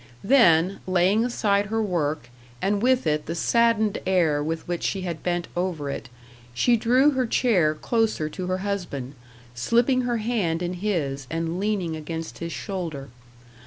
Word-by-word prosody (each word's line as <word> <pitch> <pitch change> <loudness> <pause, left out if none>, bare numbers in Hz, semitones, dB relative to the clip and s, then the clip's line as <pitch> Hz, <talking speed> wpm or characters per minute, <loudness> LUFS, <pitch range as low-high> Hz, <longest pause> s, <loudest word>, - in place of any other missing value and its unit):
Then, 195 -7 +4
laying 185 +4 +3
aside 205 -4 +1
her 225 +2 -1
work, 155 - -2 0.3
and 200 +6 0
with 255 -1 +2
it 150 -1 0
the 165 - -3
saddened 220 +3 +2
air 165 -6 +2
with 160 +1 -4
which 175 -1 -2
she 195 - -1
had 170 -3 -4
bent 175 -1 -1
over 175 -6 -2
it, - - -6 0.5
she 240 - +3
drew 250 +6 +4
her 260 -3 0
chair 185 -11 +2
closer 220 -3 0
to 180 +4 -5
her 185 0 0
husband, 170 -10 -4 0.4
slipping 240 - +2
her 245 -1 -1
hand 210 -7 -1
in 175 +1 -2
his, 160 -9 -2
and 165 +2 -2
leaning 195 -5 -1
against 160 +1 -6
his 170 0 -4
shoulder. 165 - -5
185 Hz, 160 wpm, -24 LUFS, 160-220 Hz, 0.5 s, Then